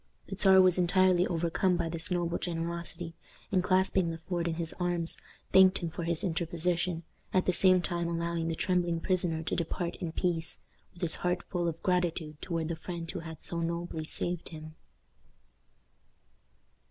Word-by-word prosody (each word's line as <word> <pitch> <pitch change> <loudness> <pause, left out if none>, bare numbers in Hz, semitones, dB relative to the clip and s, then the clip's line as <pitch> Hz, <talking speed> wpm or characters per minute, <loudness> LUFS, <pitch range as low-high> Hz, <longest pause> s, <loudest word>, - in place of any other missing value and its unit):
The 195 - -4
Czar 190 -1 +6
was 185 -1 +4
entirely 180 0 +4
overcome 175 +2 +1
by 165 - -1
this 165 +1 0
noble 175 -2 -1
generosity, 170 0 -1 0.4
and, 185 -2 +2
clasping 185 -1 +2
Le 165 - -4
Fort 170 +1 -3
in 165 - -1
his 165 -1 -1
arms, 175 -2 +1 0.4
thanked 190 0 +7
him 170 -2 -4
for 170 +1 -4
his 170 -1 0
interposition, 170 0 -1 0.3
at 185 - +3
the 185 - +2
same 185 0 +5
time 170 -2 -1
allowing 170 0 -2
the 165 - -1
trembling 175 -1 +1
prisoner 170 -3 0
to - - -2
depart 170 +1 -2
in 170 -3 -4
peace, 170 -1 -1 0.4
with 175 - -8
his 165 - +2
heart 180 0 0
full 175 -2 -2
of 165 -1 -4
gratitude 170 -4 -1
toward 165 -2 -2
the 170 - -1
friend 170 0 -6
who - - -5
had 160 -1 -8
so 170 - -2
nobly 170 -1 -3
saved 175 +1 -2
him. 155 -1 -9
170 Hz, 170 wpm, -30 LUFS, 165-180 Hz, 0.4 s, thanked